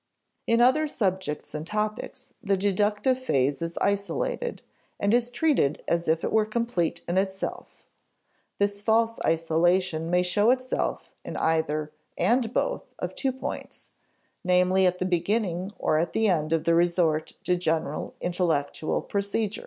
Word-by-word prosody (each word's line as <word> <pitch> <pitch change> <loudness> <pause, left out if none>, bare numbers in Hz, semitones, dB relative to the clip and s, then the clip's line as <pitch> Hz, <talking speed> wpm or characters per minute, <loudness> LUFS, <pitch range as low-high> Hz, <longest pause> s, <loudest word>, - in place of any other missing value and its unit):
In 230 +1 +3
other 260 +6 +4
subjects 190 - -2
and 155 +1 -5
topics, 215 +2 -4
the 200 -4 +1
deductive 205 +6 +1
phase 140 - +1
is 165 0 -4
isolated, 470 - -1 0.4
and 200 +2 +2
is 240 0 +2
treated 245 - +1
as 170 0 0
if 160 +1 +1
it - - -1
were 220 -1 +3
complete 215 -7 -1
in 175 +2 +2
itself. 190 0 -4 0.7
This 200 0 0
false 225 +1 +2
isolation 165 +1 +1
may 180 +1 +3
show 205 +5 +2
itself 255 0 -1
in - - -6
either 155 -2 0 0.3
(and 235 -1 +2
both) - - -2
of - - -4
two 270 - -1
points; 260 - -7 0.5
namely, 185 +1 +4
at 180 0 0
the 185 - -2
beginning 185 +1 0
or 155 - +1
at 170 - -1
the 220 0 +2
end 155 -5 +1
of 165 -1 +1
the 170 - +3
resort 170 -2 +2
to 180 - +2
general 160 -4 -2
intellectual 165 -4 -1
procedure. 200 +1 -2
185 Hz, 145 wpm, -26 LUFS, 165-220 Hz, 0.7 s, other